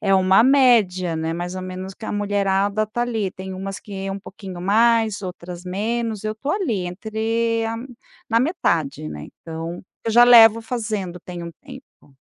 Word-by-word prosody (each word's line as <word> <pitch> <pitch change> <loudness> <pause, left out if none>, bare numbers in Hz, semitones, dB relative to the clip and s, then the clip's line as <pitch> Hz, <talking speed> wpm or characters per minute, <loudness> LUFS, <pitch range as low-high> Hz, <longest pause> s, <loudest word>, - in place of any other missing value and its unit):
é 195 -2 +2
uma 190 +2 +5
média, 230 -10 +4
né, 160 0 -2
mais 175 +1 -4
ou 185 - -4
menos 185 +1 -6
que 220 - -10
a - - -3
mulherada 205 0 0
tá 235 +3 -2
ali. 225 -5 -1
Tem 190 +1 -8
umas 195 +1 -5
que 195 -2 -6
um 195 - -4
pouquinho 190 -2 -9
mais, 220 +1 +3
outras 180 -2 -7
menos, 215 +3 -2
eu 215 0 -2
tô 275 +7 -4
ali, 235 - -1
entre 225 +4 -1
a 225 0 -3 0.5
na 230 +1 +4
metade, 170 - -1
né. 75 0 -7 0.2
Então, 165 +1 -6 0.2
eu 225 - 0
já 240 +2 +7
levo 230 -2 +8
fazendo 215 -7 -4
tem 175 0 -8
um 170 - -6
tempo. 260 - -15
200 Hz, 175 wpm, -22 LUFS, 185-225 Hz, 0.5 s, levo